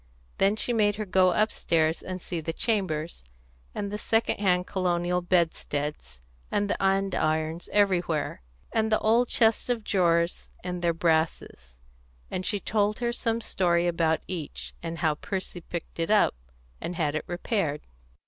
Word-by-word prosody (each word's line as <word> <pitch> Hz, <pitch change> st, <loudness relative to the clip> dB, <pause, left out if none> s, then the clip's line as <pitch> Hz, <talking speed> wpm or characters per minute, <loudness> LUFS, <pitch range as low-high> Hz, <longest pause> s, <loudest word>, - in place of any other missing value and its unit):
Then 195 Hz, +2 st, +4 dB
she 240 Hz, +2 st, +1 dB
made 205 Hz, -2 st, +3 dB
her 215 Hz, 0 st, -3 dB
go 185 Hz, -1 st, +4 dB
upstairs 165 Hz, -5 st, +1 dB
and 185 Hz, 0 st, -5 dB
see 175 Hz, -1 st, -4 dB
the 165 Hz, +1 st, -3 dB
chambers, 170 Hz, -, -1 dB, 0.5 s
and 200 Hz, -1 st, -3 dB
the 210 Hz, -, -3 dB
second 225 Hz, -1 st, +1 dB
hand 180 Hz, -3 st, +2 dB
colonial 180 Hz, -1 st, 0 dB
bedsteads, 150 Hz, -, -1 dB, 0.3 s
and 205 Hz, -, +1 dB
the -, -, -2 dB
andirons 170 Hz, -4 st, 0 dB
everywhere, 175 Hz, -, +1 dB, 0.3 s
and 220 Hz, 0 st, +1 dB
the 215 Hz, -, +5 dB
old 230 Hz, +3 st, +3 dB
chests 225 Hz, +1 st, +2 dB
of 235 Hz, -3 st, 0 dB
drawers 170 Hz, -4 st, +1 dB
and 180 Hz, -1 st, -4 dB
their 170 Hz, -1 st, +3 dB
brasses; 160 Hz, -, -1 dB, 0.5 s
and 185 Hz, -, -2 dB
she 205 Hz, -, +1 dB
told 210 Hz, +1 st, +1 dB
her 240 Hz, 0 st, -1 dB
some 230 Hz, -1 st, 0 dB
story 175 Hz, -5 st, +1 dB
about 165 Hz, -2 st, +1 dB
each, 170 Hz, -6 st, -6 dB
and 165 Hz, 0 st, -4 dB
how 155 Hz, -, +4 dB
Percy 185 Hz, +2 st, -5 dB
picked 170 Hz, 0 st, -7 dB
it 165 Hz, -, 0 dB
up 215 Hz, -1 st, +4 dB, 0.5 s
and 175 Hz, -, -4 dB
had 150 Hz, -3 st, 0 dB
it 155 Hz, -, -2 dB
repaired. 175 Hz, -4 st, -1 dB
180 Hz, 155 wpm, -27 LUFS, 165-205 Hz, 0.5 s, the